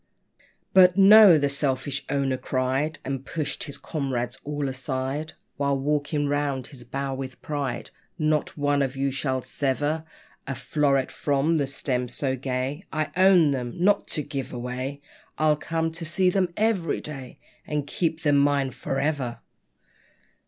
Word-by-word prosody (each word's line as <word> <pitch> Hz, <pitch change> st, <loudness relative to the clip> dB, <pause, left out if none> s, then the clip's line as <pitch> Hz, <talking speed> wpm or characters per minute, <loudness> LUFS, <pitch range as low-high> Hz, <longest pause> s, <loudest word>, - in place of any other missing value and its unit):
But 185 Hz, -1 st, +7 dB
"No," 200 Hz, -2 st, +9 dB
the 145 Hz, -1 st, +2 dB
selfish 135 Hz, -1 st, -1 dB
owner 135 Hz, -2 st, +1 dB
cried, 130 Hz, +4 st, -1 dB
And 135 Hz, 0 st, -3 dB
pushed 145 Hz, -1 st, -3 dB
his 140 Hz, -, -8 dB
comrades 130 Hz, -6 st, -3 dB
all 145 Hz, -1 st, -2 dB
aside, 130 Hz, +3 st, -3 dB, 0.2 s
While 140 Hz, -1 st, +1 dB
walking 145 Hz, +1 st, 0 dB
round 140 Hz, -3 st, -1 dB
his 130 Hz, -3 st, -12 dB
bower 135 Hz, +2 st, -3 dB
with 130 Hz, -1 st, -6 dB
pride, 145 Hz, -4 st, -3 dB, 0.3 s
"Not 155 Hz, -2 st, 0 dB
one 145 Hz, -1 st, +2 dB
of 135 Hz, -1 st, -1 dB
you 135 Hz, 0 st, 0 dB
shall 130 Hz, -1 st, -1 dB
sever 145 Hz, +3 st, -1 dB, 0.4 s
A 135 Hz, -, -2 dB
floweret 140 Hz, -3 st, +1 dB
from 145 Hz, +3 st, +1 dB
the 140 Hz, -2 st, 0 dB
stem 130 Hz, -2 st, -2 dB
so 130 Hz, +2 st, -1 dB
gay; 130 Hz, +5 st, -3 dB
I 155 Hz, -2 st, -2 dB
own 185 Hz, -5 st, +6 dB
them, 125 Hz, -3 st, -3 dB
not 195 Hz, +4 st, +3 dB
to 150 Hz, -, -1 dB
give 135 Hz, -1 st, -5 dB
away! 130 Hz, +3 st, -4 dB, 0.4 s
I'll 155 Hz, -1 st, +3 dB
come 165 Hz, +2 st, -2 dB
to 165 Hz, +1 st, -5 dB
see 180 Hz, +3 st, +2 dB
them 185 Hz, -2 st, +1 dB
every 210 Hz, -7 st, +1 dB
day; 135 Hz, -4 st, -8 dB, 0.3 s
And 150 Hz, -1 st, -1 dB
keep 160 Hz, +2 st, -2 dB
them 145 Hz, -2 st, +4 dB
mine 140 Hz, -2 st, +2 dB
for 135 Hz, +2 st, -3 dB
ever!" 140 Hz, -5 st, -1 dB
140 Hz, 150 wpm, -25 LUFS, 135-155 Hz, 0.4 s, No